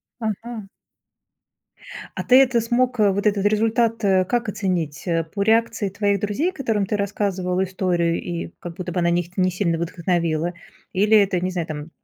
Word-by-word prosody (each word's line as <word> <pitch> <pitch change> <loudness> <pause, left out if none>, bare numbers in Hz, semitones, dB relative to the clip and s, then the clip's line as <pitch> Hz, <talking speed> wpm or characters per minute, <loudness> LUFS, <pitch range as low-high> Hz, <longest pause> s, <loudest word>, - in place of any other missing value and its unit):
Ага. 220 -2 -6 1.5
А - - -2
ты 255 - +5
это 245 -3 +3
смог, 245 +1 0
э, 205 -2 +5
вот 200 +2 -1
этот 200 -1 +2
результат, 225 +1 +1
э, 190 -2 +4
как 240 +2 -1
оценить, 180 -7 -2
э? 165 -1 +1
По 200 - -1
реакции 225 -1 +2
твоих 200 0 0
друзей, 275 - -1
которым 225 - -1
ты 210 - -1
рассказывал 190 -2 -1
историю, 180 -3 0
и, 170 -1 -4
как 170 -1 -8
будто 180 -1 -5
бы, 180 - 0
она 170 0 +2
их 175 +2 -2
не 185 -1 +2
сильно 175 -3 -1
вдохновила? 170 -1 -1 0.4
Или 210 +3 +4
это, 195 -4 +3
не 185 - -1
знаю, 175 -3 -3
там, 155 0 -6
195 Hz, 175 wpm, -22 LUFS, 175-220 Hz, 1.5 s, ты